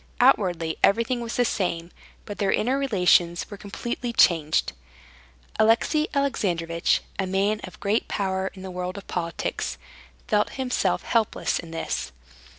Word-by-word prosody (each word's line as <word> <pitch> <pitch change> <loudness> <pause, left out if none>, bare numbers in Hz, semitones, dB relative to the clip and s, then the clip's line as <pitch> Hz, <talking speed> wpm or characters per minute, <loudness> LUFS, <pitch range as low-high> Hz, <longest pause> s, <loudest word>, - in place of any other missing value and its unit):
Outwardly 180 -10 +3
everything 230 +4 +3
was 235 -1 -4
the 245 - +3
same, 175 -5 -2 0.3
but 205 - -7
their 195 -1 +2
inner 250 +4 +1
relations 180 -8 +3
were - - -5
completely 235 +4 -4
changed. 155 - +3 0.9
Alexey 235 +8 +3
Alexandrovitch, 170 -12 +1 0.2
a 190 - 0
man 200 +3 +1
of 185 - -12
great 210 +2 0
power 190 -1 -1
in 190 - -10
the 190 - -6
world 180 +1 -4
of 200 - -8
politics, 170 -1 -3 0.5
felt 210 -3 +1
himself 260 -2 0
helpless 225 -3 0
in 170 - -8
this. 165 - -3
195 Hz, 140 wpm, -25 LUFS, 175-230 Hz, 0.9 s, Outwardly